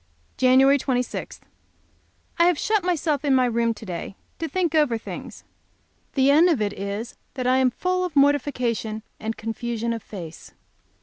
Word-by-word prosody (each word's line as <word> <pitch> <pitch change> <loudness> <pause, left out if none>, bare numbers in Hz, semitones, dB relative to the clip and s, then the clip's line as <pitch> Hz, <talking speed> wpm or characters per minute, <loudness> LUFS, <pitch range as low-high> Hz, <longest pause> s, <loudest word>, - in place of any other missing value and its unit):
Jan. 255 0 +4 0.2
26. 250 -2 -3 1.0
I 340 - +6
have 355 -3 +3
shut 430 +2 +1
myself 320 -4 0
up - - -7
in 275 -2 +4
my 255 -1 +4
room 235 -1 +1
to 220 - -11
day 180 +1 -6 0.2
to 325 - -2
think 360 -4 0
over 295 -7 +3
things. 225 - -9 0.7
The 270 0 +4
end 325 +5 +6
of 315 -8 +2
it 205 -1 -1
is 200 +4 -5 0.2
that 255 -2 -3
I 255 +1 +3
am 260 -1 +4
full 365 +8 -1
of 355 -4 -4
mortification 250 -6 +1 0.2
and 220 +1 -4
confusion 230 +1 -3
of 230 - -5
face. 170 -7 -10
255 Hz, 170 wpm, -24 LUFS, 225-300 Hz, 1.0 s, I